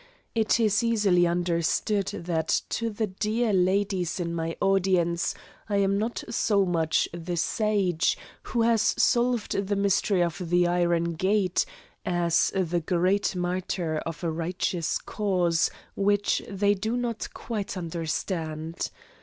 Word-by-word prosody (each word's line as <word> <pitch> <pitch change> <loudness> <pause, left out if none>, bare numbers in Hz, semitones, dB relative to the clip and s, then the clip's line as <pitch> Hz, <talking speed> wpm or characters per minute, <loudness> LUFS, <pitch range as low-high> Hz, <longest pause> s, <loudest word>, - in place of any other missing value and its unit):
It 225 0 +2
is 215 -1 +3
easily 205 -7 +3
understood 175 +4 0
that 165 -2 -1
to 230 -1 -1
the 220 +1 -1
dear 215 +3 -1
ladies 185 -1 +1
in 170 -1 -2
my 165 0 -3
audience 180 -3 +2 0.3
I 205 - 0
am 200 0 +2
not 225 +3 -2
so 205 -3 +2
much 165 -3 +1
the 175 +1 -4
sage, 190 -4 +1 0.2
who 235 -2 -1
has 230 -2 +3 0.2
solved 240 -2 +2 0.2
the 205 - 0
mystery 200 -1 +2
of 170 0 -3
the 175 0 +4
iron 170 -1 +1
grate, 190 0 +1 0.4
as 175 -2 +2
a 175 -2 +1
great 185 +5 +1
martyr 180 -2 -2
of 165 +2 -6
a 165 - 0
righteous 170 0 -1
cause, 180 -5 +1 0.3
which 205 +1 +2
they 200 0 +2
do 220 +4 -2
not 240 -2 -3
quite 210 -4 -4
understand. 165 -1 -3
185 Hz, 130 wpm, -27 LUFS, 170-205 Hz, 0.4 s, the